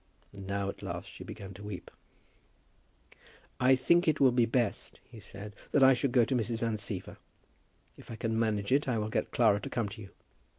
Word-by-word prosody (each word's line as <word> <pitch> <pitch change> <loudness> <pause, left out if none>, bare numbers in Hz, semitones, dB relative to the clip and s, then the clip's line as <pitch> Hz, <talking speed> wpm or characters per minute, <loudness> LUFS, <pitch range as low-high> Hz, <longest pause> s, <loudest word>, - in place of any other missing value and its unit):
And 100 -1 -9
now, 100 0 -1
at 100 - -6
last, - - -6
she - - -10
began 95 -1 -9
to 95 - -12
weep. 105 -3 -7 1.7
"I 130 +1 +5
think 170 +7 +3
it 155 -1 +2
will 135 -2 +6
be 120 -1 +3
best," 120 -3 -1
he 115 - -12
said, 100 +1 -10 0.2
"that 140 - +5
I 135 0 +8
should 130 +1 0
go 120 -2 +4
to 135 - -2
Mrs. 115 -1 0
Van 115 -1 0
Siever. 105 -2 -6 0.8
If - - -15
I 115 - -6
can 115 0 -1
manage 105 -2 0
it 140 +2 +3
I 125 -3 +1
will 105 0 -2
get - - -1
Clara 110 -4 +3
to - - -6
come 115 -4 -1
to 105 +2 -9
you." 100 - -10
115 Hz, 210 wpm, -31 LUFS, 100-125 Hz, 1.7 s, I